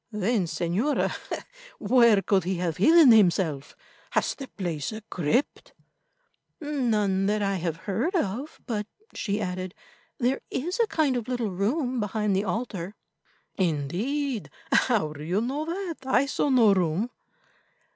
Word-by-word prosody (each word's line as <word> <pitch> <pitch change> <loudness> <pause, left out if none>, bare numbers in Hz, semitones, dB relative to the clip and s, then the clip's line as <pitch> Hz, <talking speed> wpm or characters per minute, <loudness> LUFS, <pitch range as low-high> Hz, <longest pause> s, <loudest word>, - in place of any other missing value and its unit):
"Then, 210 -1 0
Señora, 180 - 0 0.7
where 225 -2 +4
could 195 -2 +2
he 185 +1 -1
have 175 -2 -2
hidden 310 - +7
himself? 175 -9 +3 0.4
Has - - +1
the 270 - -8
place 170 - -4
a 220 0 -7
crypt?" 185 - -1 0.9
"None 220 - 0
that 210 0 +1
I 195 -1 0
have 165 -2 -2
heard 230 - -1
of; 265 - -2
but," 210 -4 -3 0.3
she 205 -1 -2
added, 185 -1 -4 0.4
"there 255 0 0
is 350 - -3
a 465 - +3
kind 305 -9 +1
of 240 -3 -3
little 245 -5 -2
room 245 - -1
behind 210 -1 0
the 195 +2 0
altar." 200 -2 -3 0.6
"Indeed. 200 - -1 0.2
How 210 -12 +2
do 150 0 -9
you 180 +6 0
know 270 +7 -2
that? 345 0 -4
I 265 0 +2
saw 285 +1 0
no 235 -6 +5
room." 185 +5 0
210 Hz, 140 wpm, -26 LUFS, 185-255 Hz, 0.9 s, hidden